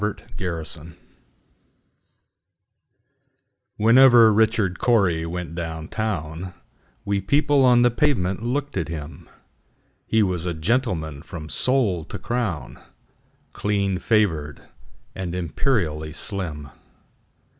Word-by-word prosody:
Richard 105 0 -4
Cory 85 -3 -5 2.8
WHENEVER 115 0 +7
Richard 110 -4 +2
Cory 90 -9 +2
went 85 -1 -5
down 80 -2 -5
town, 90 -4 -4 0.5
We 100 -1 0
people 140 +6 +3
on 125 -1 +5
the 120 - +4
pavement 115 - 0
looked 140 +5 -2
at - - -1
him:He 80 +7 -5
was 90 -3 -2
a 85 - -2
gentleman 80 - -1
from 80 -1 -9
sole 115 -11 +1
to - - -7
crown, 115 -10 -3 0.7
Clean 100 -3 -1
favored, 85 - 0 0.5
and 90 -2 -5
imperially 85 - -1
slim. 80 -8 -6
95 Hz, 95 wpm, -23 LUFS, 80-115 Hz, 2.8 s, WHENEVER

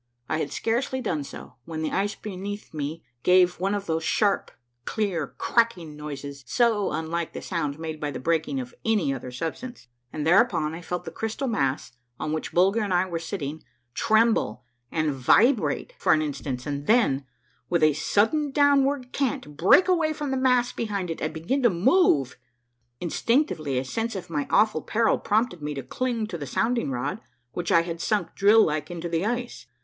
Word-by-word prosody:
I 155 - -1
had 145 - -2
scarcely 245 - -1
done 155 - -2
so - - -11
when 160 -1 -4
the 155 - -1
ice 205 +2 0
beneath 205 -1 -7
me 155 +2 -4 0.2
gawe 180 0 +6
one 195 +2 0
of 200 -1 -4
those 160 -2 -1
sharp, 200 +3 +1 0.3
clear, 180 -5 -1
cracking 185 -10 +1
noises 140 -2 -7
so 225 - +2
unlike 160 +2 -3
the - - -6
sound 150 -5 -2
made 160 -1 -5
by 150 -2 -2
the 145 - -5
breaking 155 -2 0
of 125 -1 -7
any 210 -11 +1
other 125 -1 -6
substance; 165 - -6 0.2
and 150 -1 -4
thereupon 170 -3 +3
I 165 - -7
felt 180 +1 -4
the 165 - -6
crystal 225 +9 -3
mass 140 - -1 0.3
on 155 - -2
which 155 - -3
Bulger 195 +5 +3
and 205 -2 -2
I 180 +1 +3
were 170 -3 -3
sitting 160 -3 -5 0.3
tremble 220 - +2 0.3
and 155 -2 0
vibrate 230 - +3
for - - +4
an 155 - +2
instant, 140 -3 -4
and 145 0 -4
then, 215 - +3 0.5
with 170 -2 +2
a 155 -1 +5
sudden 225 - +1
downward 280 -2 +2
cant, 225 - -2
break 190 - +5
away 335 -4 +2
from 295 -2 -4
the - - 0
mass 250 -2 +2
behind 200 -6 -3
it 165 - -6
and 155 - -1
begin 165 - -1
to 240 - +5
move! 180 - +3 0.6
Instinctively 175 - 0
a 130 - -1
sense 225 - -3
of 180 -2 -6
my 145 -3 -1
awful 210 -7 +3
peril 225 0 +1
prompted 215 -5 0
me 150 0 -4
to 135 - -5
cling 240 - -2
to 175 -5 -6
the 145 - -5
sounding 235 - 0
rod 135 - -3 0.3
which 175 -1 -3
I 165 - +5
had 170 -1 -5
sunk 200 -6 0
drill 210 +3 +5
like 150 0 -2
into 175 -1 -5
the 170 +4 0
ice. 240 +1 -4
175 Hz, 185 wpm, -25 LUFS, 150-225 Hz, 0.6 s, gawe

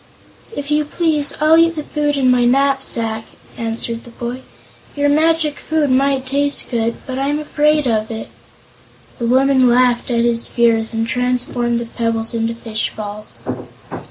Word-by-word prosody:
"If 285 +1 -5
you 300 0 +2
please, 300 -1 -1
I'll 310 +2 +5
eat 330 0 +3
the 305 - -4
food 295 -1 -1
in 260 -2 +3
my 250 -1 +3
knapsack," 245 -4 +2 0.3
answered 230 0 -3
the - - -13
boy. 240 +2 -6 0.5
"Your 290 0 +1
magic 310 0 +2
food 305 -3 0
might 270 0 +2
taste 285 +2 0
good, 230 -1 0
but 260 0 -4
I'm 285 +2 0
afraid 300 0 +1
of 220 -3 0
it." 220 -1 -6 0.9
The 235 - -1
woman 260 0 +4
laughed 245 0 +2
at 235 -1 +1
his 235 -1 +3
fears 230 -2 +1
and 225 0 -2
transformed 245 -1 -1
the 235 - -4
pebbles 230 0 -2
into 230 0 -1
fish 225 -2 -3
balls. 210 0 -6
250 Hz, 155 wpm, -18 LUFS, 230-290 Hz, 0.9 s, I'll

